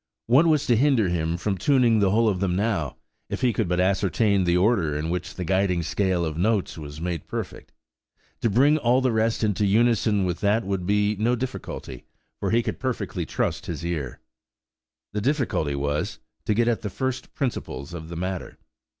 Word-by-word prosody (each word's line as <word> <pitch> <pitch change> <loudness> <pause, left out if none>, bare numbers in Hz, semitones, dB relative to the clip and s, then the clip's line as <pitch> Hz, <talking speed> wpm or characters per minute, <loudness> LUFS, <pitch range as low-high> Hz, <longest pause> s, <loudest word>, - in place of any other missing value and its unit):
What 135 +8 +5
was 155 -3 +3
to 120 - +3
hinder 120 -5 +3
him 85 -1 -1
from 95 +1 -2
tuning 120 - +3
the 100 -2 +3
whole 115 +3 +3
of 100 -4 +1
them 90 -2 0
now, 95 - -1 0.3
if - - -4
he 125 -3 +3
could 105 0 0
but 90 0 0
ascertain 95 +1 +2
the 85 0 +3
order 90 -7 +2
in 80 +2 -2
which 90 0 -4
the 90 - -4
guiding 95 -1 +1
scale 90 0 0
of 80 0 -4
notes 105 +1 +1
was 75 -1 -8
made 85 -2 -4
perfect? - - -6 0.7
To 115 - +2
bring 140 +8 +4
all 125 0 +3
the 130 -1 +2
rest 110 0 +1
into 105 -1 +1
unison 110 -1 +3
with 90 -1 -2
that 105 +3 +2
would 95 -2 -2
be 105 +1 +2
no 115 +4 +2
difficulty, 130 +2 -6 0.4
for - - -1
he 115 +1 +2
could - - -4
perfectly 130 -2 -3
trust - - -2
his 85 -1 -4
ear. 75 -7 -3 0.9
The 105 - -1
difficulty 120 - 0
was, 70 +1 -2 0.3
to 105 - +1
get 120 +1 +2
at 120 -2 +1
the 105 - -3
first 130 +5 -4
principles 100 - -4
of 80 -1 -7
the 85 - -6
matter. 90 +1 -4
100 Hz, 195 wpm, -25 LUFS, 85-115 Hz, 0.9 s, What